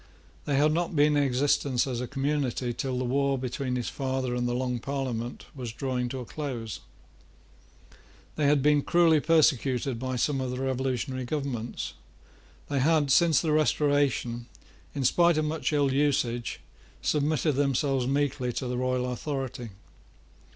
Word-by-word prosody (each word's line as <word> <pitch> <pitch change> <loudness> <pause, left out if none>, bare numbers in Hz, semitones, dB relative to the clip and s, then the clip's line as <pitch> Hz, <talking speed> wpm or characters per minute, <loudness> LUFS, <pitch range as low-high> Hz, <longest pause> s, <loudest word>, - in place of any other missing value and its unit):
They 145 - 0
had 150 +2 +4
not 170 +1 -1
been 150 0 +4
in 145 - +3
existence 135 -1 +1
as 125 -3 -3
a 125 - -3
community 135 -3 -1
till 130 +1 -3
the 130 - -1
war 140 +2 +1
between 125 0 -3
his 125 -2 -2
father 130 -2 -2
and 120 0 -1
the 120 - -1
Long 125 -1 -1
Parliament 125 -3 -4
was 125 -5 -6
drawing 125 0 -2
towards 125 -2 -6
a - - -16
close. 125 -7 -4 1.6
They 150 -2 +1
had 145 -2 +3
been 150 0 +4
cruelly 165 0 +4
persecuted 135 -6 +2
by 130 +1 -3
some 135 +2 0
of 130 - -2
the 125 0 -4
revolutionary 130 0 -2
governments. 125 -4 -3 0.7
They 140 -1 -1
had, 150 0 +3
since 165 -1 +5
the 160 - 0
Restoration, 145 -6 +1 0.5
in 140 - -1
spite 170 +5 +4
of 155 - +1
much 155 +1 -1
ill 140 -3 +2
usage, 130 -4 0 0.4
submitted 150 +1 +1
themselves 135 -1 +1
meekly 140 -2 0
to 130 - -3
the 125 0 -2
royal 125 0 0
authority. 125 -1 -4
135 Hz, 155 wpm, -27 LUFS, 125-145 Hz, 1.6 s, since